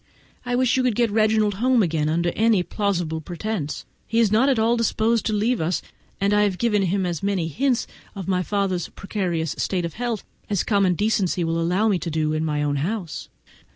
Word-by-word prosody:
I 245 - 0
wish 255 0 +2
you - - +3
could 250 -4 +1
get 235 -2 +2
Reginald 215 -1 +2
home 250 -3 +4
again 155 -3 0
on 170 +2 0
any 215 +1 +2
plausible 175 -6 -2
pretence; 175 -1 -4 0.2
he 225 - -2
is 225 -3 +4
not 235 +6 +4
at 265 - +2
all 225 +2 +3
disposed 230 -1 +1
to - - 0
leave 220 +2 +1
us, 165 +3 -1 0.4
and 200 +1 +2
I 210 - +4
have 200 -3 +1
given 210 -2 +2
him 190 0 0
as 170 -4 -3
many 195 -4 0
hints 255 - 0 0.3
of 195 -3 -6
my 185 -1 +1
father's 190 -3 -1
precarious 175 -6 -3
state 180 -3 0
of 165 - -5
health 235 -3 -3 0.3
as 200 -4 +1
common 195 -4 +2
decency 195 -3 +1
will 165 0 0
allow 180 +6 +1
me 200 -4 +2
to 170 - -4
do 155 -1 0
in 155 0 -1
my 150 -2 -1
own 145 -1 0
house. 175 +3 -3
200 Hz, 210 wpm, -23 LUFS, 170-220 Hz, 0.4 s, home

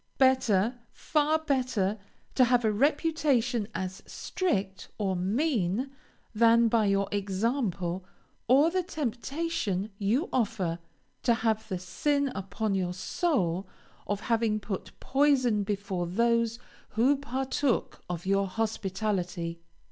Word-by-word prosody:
Better, 245 -4 +3
far 305 0 +1
better, 255 -9 0 0.3
to 255 - +5
have 245 -1 +3
a 215 - +3
reputation 270 -3 +1
as 190 +2 -4
strict, 195 - -2
or 195 -3 0
mean, 220 - 0 0.4
than 230 +1 +5
by 220 -2 +3
your 195 0 +2
example, 195 -3 -1 0.4
or 280 +7 +5
the 370 +1 +1
temptation 270 - -2
you 225 - +1
offer, 200 -8 0 0.4
to 235 -2 +3
have 220 -1 0
the 185 - -1
sin 280 +10 0
upon 200 +2 -2
your 180 -2 -1
soul 190 - 0 0.4
of 205 0 -2
having 225 -2 +1
put 200 -3 -5
poison 260 -6 +3
before 200 -3 -2
those 230 +4 +1 0.4
who 260 +6 +5
partook 270 -1 -1
of 175 0 -4
your 195 0 +2
hospitality. 190 -5 -2
220 Hz, 115 wpm, -29 LUFS, 195-265 Hz, 0.4 s, to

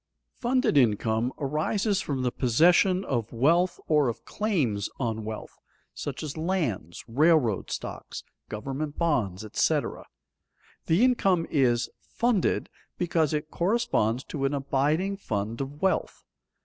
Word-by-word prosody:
_ - - -34
Funded 250 - +2
income 115 0 +2
arises 185 +8 0
from 135 -3 -2
the 125 - +1
possession 175 - +3
of 115 -4 -2
wealth 165 +9 +2
or 150 -4 +3
of 115 - -6
claims 140 - -1
on 110 -4 -2
wealth, 110 0 -7 0.3
such - - -5
as 150 -3 -5
lands, 155 - -2
railroad 135 - +3
stocks, - - -6 0.3
government 135 +7 -4
bonds, 110 - 0
etc. 105 - 0 0.8
The 170 +8 +4
income 195 -9 +2
is 125 -5 +2
"funded" 235 -6 0 0.3
because 165 -4 +1
it 155 0 -3
corresponds 170 - +1
to 140 -3 -3
an 140 +1 0
abiding 145 +8 0
fund 110 - -3
of 140 +4 -6
wealth. 190 - 0
145 Hz, 125 wpm, -27 LUFS, 120-175 Hz, 0.8 s, The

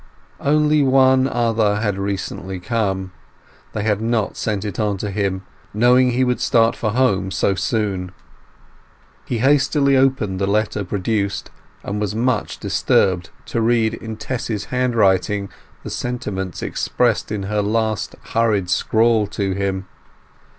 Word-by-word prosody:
Only 150 +1 +3
one 130 -1 +4
other 115 -4 +1
had 105 -2 -1
recently 95 -1 -4
come. 95 -3 -2 0.6
They 105 - -2
had 105 -1 0
not 115 -2 0
sent 105 -2 -2
it 105 -1 -5
on 105 -2 0
to 100 +1 -4
him, 95 -1 -1 0.3
knowing 125 +3 +5
he 125 +1 +1
would 125 -1 0
start 115 -1 +3
for 110 -3 -2
home 105 -7 +2
so 95 +2 +1
soon. 95 -1 -2 1.1
He 120 - -2
hastily 140 +2 +3
opened 130 -8 +1
the 100 - 0
letter 105 0 0
produced, 100 +1 -2 0.3
and 105 +1 -3
was 105 0 -2
much 125 +3 0
disturbed 90 -3 +1 0.2
to 115 - -2
read 115 -1 +2
in 110 -1 -7
Tess's 110 -3 -3
handwriting 105 -5 +2 0.3
the - - -6
sentiments 95 -7 -4
expressed 120 -4 0
in 105 -2 -2
her 105 +2 -1
last 110 0 -1 0.2
hurried 105 -5 +1
scrawl 110 -1 +2
to 100 -1 -2
him. 95 -1 -2
105 Hz, 135 wpm, -20 LUFS, 100-120 Hz, 1.1 s, knowing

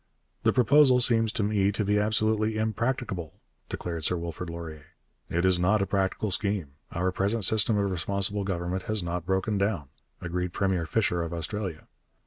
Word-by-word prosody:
'The - - +3
proposal 130 +1 +5
seems 115 -2 +4
to 110 -3 -1
me 100 -1 +2
to 105 0 -2
be 105 +1 +2
absolutely 110 +1 +1
impracticable,' 110 - -2 0.3
declared 85 -3 -4
Sir 90 - +1
Wilfrid 85 +1 -5
Laurier. 80 -3 -8 0.4
'It 85 +2 0
is 95 -1 +4
not 100 +5 +3
a 100 - +1
practical 95 +2 -1
scheme; 100 -4 0 0.2
our 90 +2 0
present 100 +3 0
system 110 +2 +3
of 100 -1 0
responsible 100 +3 -1
government 90 -1 -2
has 110 -3 -1
not 85 0 -4
broken 95 +2 0
down,' 95 -9 -1 0.3
agreed 90 +1 -3
Premier 95 -4 0
Fisher 90 -2 +1
of 85 0 -4
Australia. 85 0 -4
100 Hz, 165 wpm, -27 LUFS, 85-110 Hz, 0.4 s, proposal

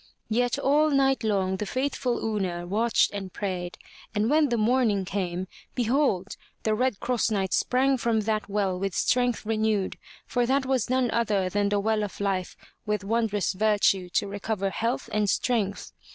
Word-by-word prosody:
Yet 245 +2 +1
all 300 +3 +3
night 270 -3 +2
long 190 -3 +1
the 210 - -4
faithful 255 -2 -1
Una 185 -5 -2
watched 220 +6 +2
and 195 -2 -6
prayed, 180 -3 -4 0.4
and 215 +4 +1
when 305 -1 +4
the 240 - +1
morning 220 -3 +2
came, 185 -1 -3 0.3
behold! 240 -6 +1 0.3
the 220 - +1
Red 250 -1 0
Cross 240 -2 0
Knight 195 -3 -1
sprang 265 +1 +2
from 230 -2 +1
that 215 0 -1
well 195 -3 0
with 195 -2 -2
strength 245 -2 +1
renewed, 215 -3 0 0.3
for 245 -1 0
that 265 +1 +2
was 260 -3 0
none 255 -2 +1
other 210 -5 +1
than 205 +1 +1
the 205 0 +1
well 215 +1 +1
of 205 -3 -5
life 195 -3 -1 0.3
with 210 -1 -2
wondrous 210 -2 0
virtue 195 -2 +2
to - - +1
recover 200 0 -2
health 230 +4 -2
and 210 -1 +1
strength. 215 -5 -1
215 Hz, 165 wpm, -26 LUFS, 195-245 Hz, 0.4 s, when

